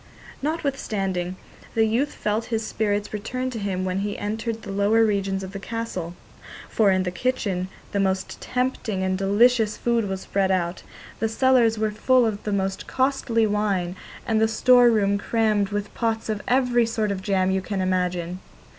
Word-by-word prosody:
Notwithstanding, 210 - -2 0.4
the 225 -1 +4
youth 240 +7 +1
felt 215 +2 -1
his 225 -2 -2
spirits 210 -1 -1
return 255 +5 -3
to 230 - -5
him 190 -2 -2
when 185 +1 -1
he 205 +1 -3
entered 225 +2 -3
the 200 - -6
lower 205 +3 +3
regions 195 -2 0
of 190 - -7
the 195 - -6
castle, 195 -5 -5 0.5
for 215 -3 +3
in 185 -1 +2
the 180 - -2
kitchen 195 -5 -1 0.2
the 200 - 0
most 190 -1 -1
tempting 250 -6 -2
and 185 0 0
delicious 215 +3 +3
food 235 -3 +1
was 190 -1 -3
spread 195 -1 0
out, 180 -2 0 0.4
the 225 - 0
cellars 235 -1 +3
were 215 0 0
full 250 +3 +3
of 210 -2 -2
the 210 - -1
most 195 -1 -2
costly 260 -4 +1
wine, 200 -4 0 0.3
and 220 -1 +1
the 220 - +5
store 245 +2 +5
room 200 -3 +2
crammed 215 -2 +1
with 205 0 -4
pots 225 -1 -1
of 210 -1 -1
every 245 -2 +3
sort 220 -2 -1
of 190 -1 -3
jam 190 -1 +1
you 190 0 +1
can 195 +1 -3
imagine. 180 -1 -1
210 Hz, 175 wpm, -24 LUFS, 190-230 Hz, 0.5 s, the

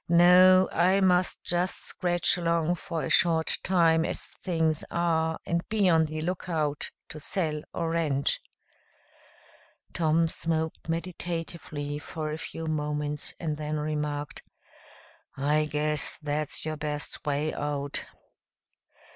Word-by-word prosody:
No, 180 +2 +7
I 185 +3 +3
must 180 -1 +2
just 175 +2 0
scratch 175 -2 +2
along 170 -1 +1
for 165 -2 -4
a - - -2
short 165 -2 +3
time 165 -3 +3
as - - -2
things 160 -3 -1
are 160 -1 +1
and 170 0 0
be 210 -3 +2
on 160 -2 +4
the 155 0 -4
lookout 160 -4 -2 0.2
to 155 - -8
sell 155 -1 -1
or 165 -1 -2
rent." 150 -4 0 1.5
Tom 165 0 +2
smoked 160 0 -2
meditatively 165 -3 -4
for 155 0 -5
a 155 - -4
few 165 0 -6
moments, 150 -1 -2
and 155 -3 -2
then 155 0 -3
remarked, 150 -1 -3 1.0
"I 150 +2 +2
guess 150 0 -1
that's 150 0 -1
your 155 0 -3
best 150 0 -3
way 150 +1 -1
out." 145 -1 -2
160 Hz, 120 wpm, -28 LUFS, 150-170 Hz, 1.5 s, No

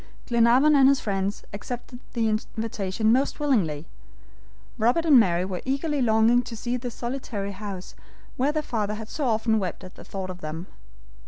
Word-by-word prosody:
Glenarvan 240 +5 +4
and 270 -1 +7
his 275 -1 +3
friends 195 -1 -2
accepted 245 +4 -7
the 230 -2 +1
invitation 215 -1 -1
most 265 +6 +1
willingly. 185 - +1 0.9
Robert 245 +9 +2
and 290 -6 +7
Mary 180 -4 +2
were 185 -2 -4
eagerly 280 +2 -1
longing 225 +1 +4
to 235 -1 -8
see 240 +2 -2
the 250 0 -4
solitary 235 -4 -4
house 195 -2 -7 0.4
where 270 +4 +1
their 305 0 -1
father 210 -5 -2
had 220 0 -8
so 300 - -3
often 220 -1 +2
wept 185 -4 -4
at 185 - -10
the - - -13
thought 190 -1 -5
of 180 0 -11
them. 155 +3 -5
225 Hz, 170 wpm, -25 LUFS, 200-255 Hz, 0.9 s, and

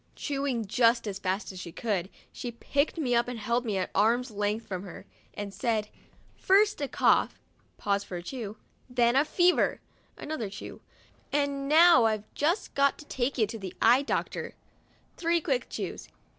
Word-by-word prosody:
Chewing 275 -5 -2
just 230 +2 +3
as 200 -1 -4
fast 190 +2 -2
as 185 - -9
she 175 -2 -7
could, 195 -3 -2 0.2
she 245 - -5
picked 280 +7 -1
me 265 -6 0
up 235 0 +3
and 245 -1 -4
held 235 +3 -1
me 210 -4 -1
at 185 - -2
arms' 230 +4 +2
length 210 +2 -2
from 185 -4 -4
her, 185 -3 -10 0.3
and 205 -1 -5
said: 210 +1 -1 0.5
"First 410 -1 +3
a 285 - 0
cough* - - +2 0.4
(pause 200 -1 0
for 180 - -6
a 175 - -7
chew), 220 0 -6 0.3
"then 245 +2 +3
fever!' 355 +3 +2 0.4
(another 275 -9 -4
chew), 205 - -9 0.3
" - - -34
and 280 -1 0
now 315 -5 +7
I've 215 -2 +1
just 335 +8 0
got 280 0 +2
to 300 - -12
take 265 -1 -2
you 220 - +4
to 220 +2 -7
the 190 -2 -7
eye 240 +4 +5
doctor" 280 - -3 0.6
(three 340 0 +2
quick - - -1
chews). - - -5
235 Hz, 175 wpm, -28 LUFS, 205-280 Hz, 0.6 s, now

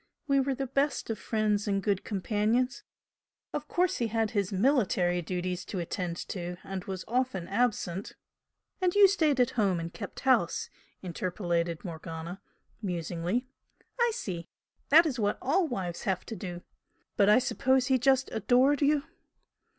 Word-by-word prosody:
We 275 -1 +4
were 270 0 0
the 270 - -2
best 275 -1 0
of 215 - -4
friends 210 -1 0
and 200 -1 +1
good 200 -3 0
companions. 220 +5 0 0.7
Of - - -3
course 360 0 +1
he 235 - 0
had 225 0 0
his 200 -3 0
military 190 -6 +2
duties 180 +1 -3
to 195 - -5
attend 175 0 -3
to 175 -1 -4
and 195 -1 -5
was 190 -1 -5
often 245 -7 -1
absent 200 -4 -1 0.3
" - - -50
"And 365 0 +2
you 410 -1 +9
stayed 315 -8 +2
at 245 - +3
home 195 -6 +1
and 165 +1 -5
kept 205 - -7
house," 250 -10 +2 0.3
interpolated 175 -1 -2
Morgana, 165 +2 -6 0.4
musingly 180 - -2 0.5
"I 475 0 +4
see! 170 -4 -5 0.4
That 330 +4 +8
is 265 -6 -2
what 205 -1 +1
all 330 +7 +2
wives 185 - -4
have 190 -2 -1
to 225 - -6
do! 175 -4 -6 0.5
But 200 -1 +4
I 210 - +7
suppose 255 +1 +2
he 260 -1 +3
just 265 +1 +3
adored 255 +6 +3
you?" 290 0 +3
210 Hz, 160 wpm, -29 LUFS, 180-260 Hz, 0.7 s, you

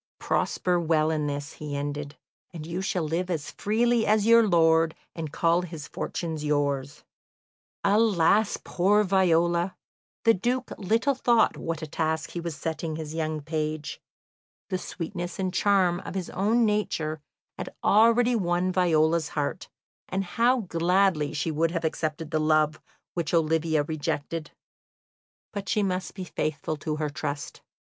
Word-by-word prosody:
"Prosper 180 -1 0
well 160 -1 +2
in 150 -2 -1
this," 145 +1 -4
he 150 -2 -6
ended, 145 0 -4 0.3
"and 160 -3 -7
you 170 +3 -3
shall 185 -2 -1
live 170 +4 -2
as 160 -5 -3
freely 230 +2 +1
as 210 -1 +3
your 230 -1 +6
lord, 165 -2 +4 0.2
and 160 -3 -5
call 170 +2 +2
his 165 -5 -7
fortunes 160 -3 -4
yours." 145 -2 -1 0.8
Alas, 205 -1 +3
poor 205 +4 +3
Viola! 175 -2 +2 0.5
The 230 - +6
Duke 245 +6 -1
little 225 +8 +2
thought 240 -3 +3
what 165 -1 -4
a - - -2
task 160 +1 -2
he 175 - -4
was 170 -2 -4
setting 160 +1 -3
his 155 -1 -6
young 155 -1 -2
page. 155 0 -3 0.7
The 185 - -1
sweetness 175 0 -5
and 185 -1 -2
charm 190 -4 +3
of 195 - -8
his 185 -2 -3
own 225 +5 +2
nature 160 -8 -1 0.4
had - - -4
already 230 +3 +5
won 180 -2 +1
Viola's 165 -3 +2
heart, 145 +5 -2 0.4
and 190 +1 -1
how 235 +7 +2
gladly 175 -3 +2
she 155 +1 -2
would 160 +2 +1
have 170 -1 -2
accepted 155 0 -2
the 155 - +1
love 155 0 +2 0.3
which 170 -1 -1
Olivia 160 -1 +2
rejected! 155 +1 -3 1.0
But 200 -2 -5
she 210 - +2
must 185 -1 -2
be 190 - -5
faithful 155 -3 -3
to 150 +1 -3
her 150 -1 -2
trust. 145 -1 -5
170 Hz, 150 wpm, -26 LUFS, 155-190 Hz, 1.0 s, your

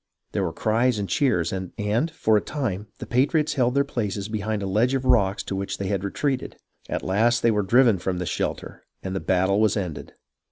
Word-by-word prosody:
There 100 - -1
were 85 - -1
cries 115 +6 +1
and 100 -1 -2
cheers, 95 - +1
and, 95 -1 -5 0.4
for 110 -9 +1
a 105 - +3
time, 110 -9 -3
the - - -7
patriots 150 +5 +1
held 125 -2 +1
their 140 - +4
places 105 -7 -3
behind 110 -1 -2
a - - -2
ledge 110 +7 +2
of 130 -1 -2
rocks 105 -6 +3
to 95 - -4
which 100 0 -3
they 100 -1 -3
had 100 -2 -1
retreated. 130 +6 -2 0.3
At - - -2
last 115 +5 +2
they 115 - +5
were 105 -1 +1
driven 115 0 +4
from 90 0 -2
this 90 -1 -3
shelter, - - -3 0.2
and 95 0 -4
the - - 0
battle 95 +3 +2
was 110 -1 +3
ended. 90 -7 -5
105 Hz, 210 wpm, -24 LUFS, 95-125 Hz, 0.4 s, they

